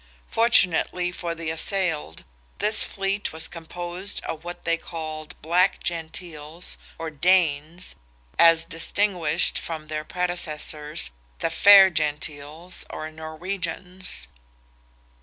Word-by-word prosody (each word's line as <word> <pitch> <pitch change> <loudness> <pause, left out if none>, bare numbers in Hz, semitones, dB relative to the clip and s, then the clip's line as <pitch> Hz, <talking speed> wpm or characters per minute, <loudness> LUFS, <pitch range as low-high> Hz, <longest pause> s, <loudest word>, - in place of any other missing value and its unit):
Fortunately 180 -5 +3
for 170 -2 -4
the 165 -1 -4
assailed, 165 - -2 0.3
this 215 +1 +7
fleet 195 0 -2
was 160 0 -1
composed 175 +3 -5
of 160 0 -6
what 175 +1 -8
they 170 - +2
called 155 -2 -8
Black 180 +4 +2
Gentiles, 165 -1 -2 0.2
or 165 -1 -5
Danes, 165 0 +1 0.4
as 165 -1 +6
distinguished 170 -1 +1
from 155 -2 -6
their 155 0 -3
predecessors, 155 - -1 0.3
the 165 - -1
Fair 195 +2 +8
Gentiles, 155 +2 -2
or 155 0 -6
Norwegians. 180 +3 -5
165 Hz, 100 wpm, -24 LUFS, 155-180 Hz, 0.4 s, Fair